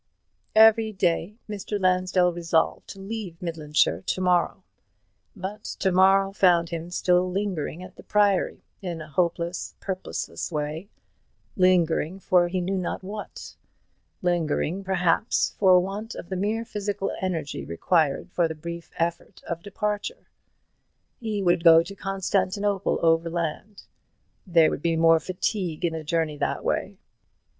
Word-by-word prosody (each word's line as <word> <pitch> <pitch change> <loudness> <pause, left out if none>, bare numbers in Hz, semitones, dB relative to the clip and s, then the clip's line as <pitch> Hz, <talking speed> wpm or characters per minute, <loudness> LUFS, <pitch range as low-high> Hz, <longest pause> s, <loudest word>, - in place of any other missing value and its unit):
Every 220 0 +6
day 185 0 0
Mr. 205 0 -4
Lansdell 185 -1 +2
resolved 165 -1 0
to 195 - -10
leave 195 -4 -6
Midlandshire 155 -4 0
to 185 - -2
morrow; 180 -2 +1 0.7
but 205 +2 -6
to 190 - +1
morrow 195 +1 +4
found 175 -4 +3
him 170 0 -5
still 180 0 +2
lingering 180 -4 -3
at 185 - -12
the - - -10
Priory, 205 -3 +1 0.2
in 175 -4 -4
a 155 - -8
hopeless, 170 +2 -1
purposeless 185 -1 -4
way, 155 +5 -4 0.7
lingering 180 -1 +2
for 180 -2 +3
he 180 +1 -2
knew 190 +2 -1
not 180 - -4
what, 205 +2 -8 0.7
lingering, 175 +1 0
perhaps, 185 +1 +1
for 185 -3 +6
want 200 +5 -4
of 170 - -9
the 190 - -3
mere 215 +5 -1
physical 205 -2 -3
energy 165 -6 -3
required 150 - 0
for 175 -2 +2
the 160 - -6
brief 170 +2 -7
effort 170 +1 -3
of 170 0 -5
departure. 210 - -4 0.9
He 215 -4 -2
would 175 -2 +2
go 165 -1 +8
to 200 - -9
Constantinople 195 +1 -1
overland; 165 +4 0 0.6
there 165 -3 +5
would - - -4
be 165 0 +1
more 165 0 +5
fatigue 180 0 -2
in 165 - 0
the 160 -1 -5
journey 155 -1 -1
that - - -2
way. - - -2
180 Hz, 135 wpm, -25 LUFS, 165-195 Hz, 0.9 s, go